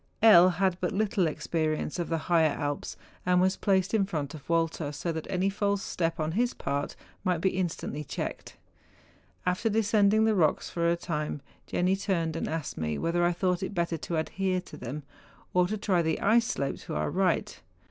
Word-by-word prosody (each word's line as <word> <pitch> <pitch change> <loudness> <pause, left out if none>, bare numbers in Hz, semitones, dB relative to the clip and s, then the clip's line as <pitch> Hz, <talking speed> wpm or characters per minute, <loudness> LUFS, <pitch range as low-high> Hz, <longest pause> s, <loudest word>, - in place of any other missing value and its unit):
L. 185 -5 +9
had 185 +1 +1
had - - -16
but 180 - 0
little 200 -3 +1
experience 155 +1 -2
of 175 - -2
the 165 - +1
higher 160 0 +3
Alps, 145 -11 -3 0.3
and 180 0 +3
was 190 +1 +3
placed 190 0 +1
in 215 -3 +4
front 150 -6 -3
of 155 -1 -11
Walter, 165 -3 0
so 160 +4 -3
that 160 -1 -5
any 190 0 +1
false 200 0 0
step 165 -1 -2
on. 155 0 0
his 240 +7 0
part 140 +1 -3 0.3
might 180 -4 +1
be 190 +3 +2
instantly 175 -4 -3
checked. - - -5 0.9
After 180 +5 +1
descend¬ 210 -1 +3
ing 215 +1 +4
the 220 - +3
rocks 165 -7 +1
for 170 -1 +1
a 170 - +3
time, 150 -4 -3 0.2
Jenni 180 +2 +1
turned 170 -5 -1
and 165 - -2
asked 160 -2 -4
me 75 -2 -1
whether 175 - 0
I 175 - +4
thought 180 0 0
it 195 +2 -4
better 170 -1 0
to 165 +2 -3
adhere 185 +3 0
to - - -12
them, 135 +5 -6 0.5
or 180 0 +4
to 215 +3 -2
try 190 -4 +1
the 160 -1 0
ice 225 +2 +3
slope 140 0 -2
to - - -6
our - - -1
right. 185 -2 0
175 Hz, 200 wpm, -28 LUFS, 160-195 Hz, 0.9 s, L